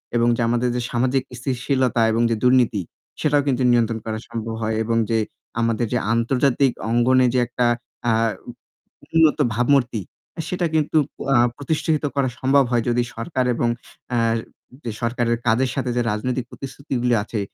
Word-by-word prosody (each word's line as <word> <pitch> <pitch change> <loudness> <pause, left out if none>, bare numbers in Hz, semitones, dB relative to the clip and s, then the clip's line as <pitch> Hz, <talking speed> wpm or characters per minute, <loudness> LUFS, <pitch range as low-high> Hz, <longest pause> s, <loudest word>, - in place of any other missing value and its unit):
এবং 120 0 +3
যে - - -1
আমাদের 120 +1 +1
যে 125 - -1
সামাজিক 130 +2 +1 0.2
স্থিতিশীলতা 130 -1 0
এবং 115 +1 +1
যে - - +2
দুর্নীতি, 125 -5 +3 0.4
সেটাও 145 -1 +3
কিন্তু 130 -2 +1
নিয়ন্ত্রণ 115 -1 +2
করা 110 -1 -3
সম্ভব 115 0 -4
হয়, 110 0 0
এবং 115 +1 0
যে 115 - +2 0.4
আমাদের 115 0 +1
যে - - +3 0.2
আন্তর্জাতিক 125 +3 +2 0.2
অঙ্গনে 125 +2 +4
যে 130 - +3
একটা 125 0 -1 0.4
আ - - +4 0.4
উ - - -4 0.6
উন্নত 160 -2 +5 0.2
ভাবমূর্তি, 125 -2 +2 0.5
সেটা 180 -1 -1
কিন্তু 155 0 +1 0.4
আ - - +5 0.2
প্রতিষ্ঠিত 155 +1 -1
করা 135 -2 +2
সম্ভব 135 +1 +4
হয় 120 -2 +2
যদি 120 0 +2
সরকার 130 -7 -2
এবং 120 - 0 0.5
আ - - +2 0.7
যে 115 - -3
সরকারের 120 0 0
কাজের 125 +2 +2
সাথে 130 -2 -2
যে - - +2
রাজনৈতিক 125 +4 -2
প্রতিশ্রুতিগুলি 135 -3 -2
আছে, 105 0 -4
125 Hz, 155 wpm, -22 LUFS, 115-135 Hz, 0.7 s, উন্নত